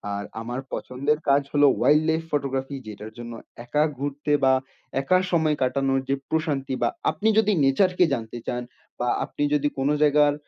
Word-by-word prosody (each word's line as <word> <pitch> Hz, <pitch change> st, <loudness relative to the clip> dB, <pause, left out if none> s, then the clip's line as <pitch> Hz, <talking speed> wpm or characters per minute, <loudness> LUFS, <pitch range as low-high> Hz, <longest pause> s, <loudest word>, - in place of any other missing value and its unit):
আর 100 Hz, -, -4 dB, 0.2 s
আমার 120 Hz, +3 st, -4 dB
পছন্দের 140 Hz, +4 st, -1 dB
কাজ 140 Hz, +1 st, +5 dB
হল 145 Hz, -, +3 dB, 0.2 s
অয়াইল্ড 150 Hz, +2 st, +5 dB
লাইফ 160 Hz, 0 st, +1 dB
ফটোগ্রাফি 135 Hz, -1 st, -2 dB
যেটার 105 Hz, +1 st, -8 dB
জন্য 120 Hz, 0 st, -7 dB, 0.3 s
একা 150 Hz, +5 st, +2 dB
ঘুরতে 145 Hz, +2 st, -3 dB
বা 130 Hz, 0 st, +5 dB, 0.5 s
একা 185 Hz, +7 st, +3 dB
সময় 160 Hz, -3 st, +2 dB
কাটানোর 135 Hz, +1 st, +1 dB
যে 135 Hz, -, +3 dB
প্রশান্তি 145 Hz, -5 st, -1 dB
বা -, -, +3 dB, 0.2 s
আপনি 220 Hz, -, -2 dB
যদি 215 Hz, -1 st, +3 dB
নেচার 140 Hz, +8 st, +3 dB
কে 180 Hz, -, +7 dB
জানতে 115 Hz, +1 st, -4 dB
চান 125 Hz, 0 st, -2 dB, 0.4 s
বা 125 Hz, -, -1 dB, 0.2 s
আপনি 145 Hz, -, -4 dB
যদি 145 Hz, 0 st, +2 dB
কোনো 140 Hz, +3 st, +2 dB
জায়গার 145 Hz, 0 st, +5 dB
140 Hz, 170 wpm, -24 LUFS, 130-150 Hz, 0.5 s, কে